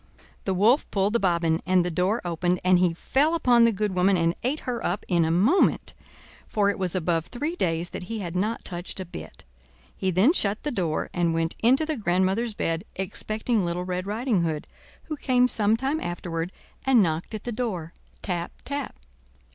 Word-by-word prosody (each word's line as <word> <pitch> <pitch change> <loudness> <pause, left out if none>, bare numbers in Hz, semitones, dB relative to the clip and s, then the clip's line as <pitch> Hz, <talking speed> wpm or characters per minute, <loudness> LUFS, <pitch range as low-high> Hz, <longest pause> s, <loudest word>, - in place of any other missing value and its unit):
The 190 - 0
Wolf 225 +9 +3
pulled 200 +1 +1
the 235 - +3
bobbin, 170 -4 +1
and 185 -1 +3
the 180 - -1
door 185 +7 0
opened, 175 +1 0
and 185 0 +4
he 180 -1 +3
fell 285 - +1
upon 245 -7 +5
the 230 - +4
good 210 -1 -1
woman 185 +1 +3
and 165 0 +2
ate 275 +5 -1
her 240 -2 -4
up 180 +4 -2
in 170 -2 +2
a 160 - +1
moment, 210 - +2 0.5
for 205 -1 +2
it - - -7
was 185 -2 0
above 165 -2 0
three 295 +7 -3
days 170 - -1
that 180 - -6
he 225 +4 -4
had 180 -4 -5
not 215 +5 -1
touched 175 +1 -4
a 185 - -4
bit. 175 - -10 0.5
He 190 - -1
then 190 - +4
shut 210 - 0
the 295 - -2
door 170 -8 -2
and 170 -2 +1
went 165 0 0
into 260 +7 +4
the 310 -2 -2
grandmother's 195 +3 0
bed, 165 -2 -1
expecting 215 +3 -1
Little 175 +1 -2
Red 180 +1 -3
Riding 220 -1 0
Hood, 160 -3 -2 0.4
who 305 - -5
came 250 -3 +3
some 220 -2 +5
time 275 +5 -1
afterward 175 0 -4 0.3
and 255 -5 +5
knocked 165 +5 -2
at 210 - -7
the 240 - -4
door—tap, 180 -4 -5
tap. 285 -1 -4
190 Hz, 195 wpm, -25 LUFS, 175-235 Hz, 0.5 s, upon